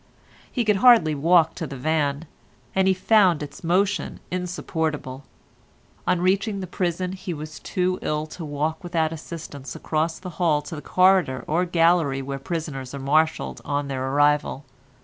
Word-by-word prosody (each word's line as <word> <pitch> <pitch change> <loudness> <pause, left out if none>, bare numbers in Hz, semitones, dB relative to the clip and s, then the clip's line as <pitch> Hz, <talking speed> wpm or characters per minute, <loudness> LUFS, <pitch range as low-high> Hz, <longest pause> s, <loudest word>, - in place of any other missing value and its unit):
He 240 -3 -1
could 210 -2 +3
hardly 230 -8 +6
walk 165 +2 +4
to 165 - -5
the 135 0 -7
van, 145 +1 0 0.5
and 190 0 +2
he 190 - +5
found 185 -4 +4
its 145 +2 -10
motion 190 +4 0
insupportable. 160 -7 -3 0.8
On 180 -1 +2
reaching 195 +3 +1
the 190 - -4
prison 180 0 -2
he 185 -2 -5
was 155 +1 -8
too 185 0 -1
ill 150 0 -1
to 160 +2 -9
walk 155 +2 -2
without 165 -2 0
assistance 150 -5 -8
across 160 +1 -1
the 185 -1 -8
hall 150 -4 +3
to - - -7
the 150 - -7
corridor 185 -6 +3
or 170 +4 +1
gallery 165 -5 +2
where 135 0 -4
prisoners 140 -4 -5
are - - -5
marshalled 155 +4 +1
on 145 -1 -2
their 130 -1 -2
arrival. 145 0 +2
160 Hz, 160 wpm, -24 LUFS, 145-180 Hz, 0.8 s, hardly